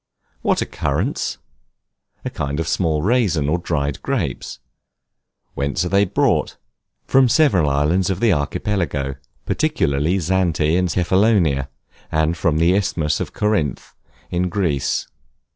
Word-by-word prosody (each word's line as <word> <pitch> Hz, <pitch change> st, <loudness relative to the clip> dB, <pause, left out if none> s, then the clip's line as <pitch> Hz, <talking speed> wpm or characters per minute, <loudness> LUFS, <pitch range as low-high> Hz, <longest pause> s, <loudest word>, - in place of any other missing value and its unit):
What -, -, +1 dB
are -, -, -6 dB
Currants? -, -, -2 dB, 0.9 s
A -, -, -3 dB
kind 75 Hz, +1 st, -3 dB
of 80 Hz, -, -2 dB
small 80 Hz, -3 st, 0 dB
raisins 95 Hz, -, +2 dB
or 85 Hz, +4 st, +1 dB
dried 75 Hz, -5 st, -2 dB
grapes. -, -, -3 dB, 1.0 s
Whence 70 Hz, +5 st, -1 dB
are -, -, -2 dB
they 100 Hz, +1 st, +3 dB
brought? 90 Hz, -, 0 dB, 0.5 s
From 130 Hz, -2 st, +4 dB
several 100 Hz, -, +3 dB
islands 75 Hz, +7 st, +1 dB
of 95 Hz, -1 st, -1 dB
the 115 Hz, -3 st, +3 dB
Archipelago, 75 Hz, -3 st, -2 dB, 0.3 s
particularly 80 Hz, -, 0 dB
Zante 85 Hz, -3 st, +1 dB
and 90 Hz, 0 st, +1 dB
Cephalonia; 90 Hz, -6 st, +2 dB, 0.4 s
and 80 Hz, +2 st, +1 dB
from 80 Hz, -2 st, 0 dB
the 85 Hz, +3 st, +3 dB
Isthmus 80 Hz, -6 st, 0 dB
of -, -, -4 dB
Corinth, 105 Hz, -, -1 dB, 0.4 s
in 90 Hz, +1 st, 0 dB
Greece. 85 Hz, -8 st, -1 dB
85 Hz, 125 wpm, -20 LUFS, 75-95 Hz, 1.0 s, From